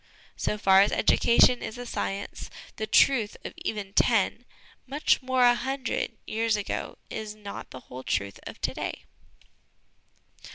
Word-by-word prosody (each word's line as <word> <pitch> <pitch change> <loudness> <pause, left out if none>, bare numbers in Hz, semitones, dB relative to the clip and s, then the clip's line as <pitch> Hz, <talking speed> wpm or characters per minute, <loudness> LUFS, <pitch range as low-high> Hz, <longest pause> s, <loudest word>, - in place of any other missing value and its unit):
" - - -26
So 210 - -1
far 195 -2 +6
as 200 - +3
education 240 +1 +4
is 225 - -6
a 245 - -6
science, 200 -4 -4 0.3
the 215 - -3
truth 225 -1 +3
of - - -5
even 200 -2 -4
ten 230 +2 +2 0.4
much 285 +2 +2
more, 260 -1 +2
a 245 0 +7
hundred 260 -2 -3
years 225 0 0
ago 205 - -4
is 215 -1 -5
not 205 -1 -8
the 130 - -10
whole 125 +1 -9
truth 100 -6 -2
of - - -9
to - - -1
day. - - -5
220 Hz, 155 wpm, -27 LUFS, 200-245 Hz, 0.4 s, a